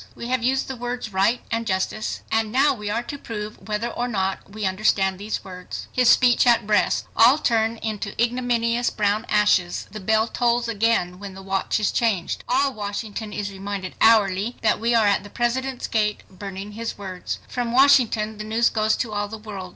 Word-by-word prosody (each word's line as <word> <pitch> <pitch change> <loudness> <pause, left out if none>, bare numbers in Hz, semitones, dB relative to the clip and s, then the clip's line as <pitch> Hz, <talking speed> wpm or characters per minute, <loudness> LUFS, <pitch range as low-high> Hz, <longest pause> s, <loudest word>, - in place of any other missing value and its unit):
We 235 - -7
have 255 -1 +1
used 265 +3 +1
the 265 - -5
words 245 -3 -5
'right' 195 +6 +2
and 230 0 -1
'justice' 190 +3 -2
and 220 -1 +1
now 275 +5 +4
we 210 -1 -6
are 230 +3 -1
to 285 +3 -7
prove 210 -3 -7
whether 215 +2 -2
or 245 +1 -3
not 195 -5 -2
we 210 0 -4
understand 190 -1 +1
these 210 +2 -4
words;" 180 -1 -8
his 250 -2 +3
speech 245 -1 +5
at 235 -3 +4
Brest; 210 0 +2
all 240 +5 +6
turn 230 -5 +1
into 215 -2 -4
ignominious 240 0 +1
brown 210 +2 0
ashes. 205 -4 +2
The 215 - -7
bell 220 +2 +2
tolls 240 0 +1
again 215 -5 0
when 200 -2 -8
the 195 - -10
watch 195 +2 -1
is 210 - +1
changed. 210 -7 -1
All 270 +2 +2
Washington 210 +1 -5
is 205 -1 -4
reminded 195 -1 -5
hourly 215 0 +4
that 215 - +2
we 235 +2 +1
are 225 -2 +4
at 200 -2 +2
the 205 - -11
President's 250 +3 -2
gate, 210 -2 0
burning 195 +1 -7
his 230 +2 -5
words. 190 -3 -5
From 240 -2 -3
Washington 235 -5 +4
the - - -4
news 225 +2 +1
goes 215 0 +1
to 225 -4 -3
all 205 0 -1
the 220 +2 -7
world. 205 -4 -8
215 Hz, 195 wpm, -23 LUFS, 200-235 Hz, -, all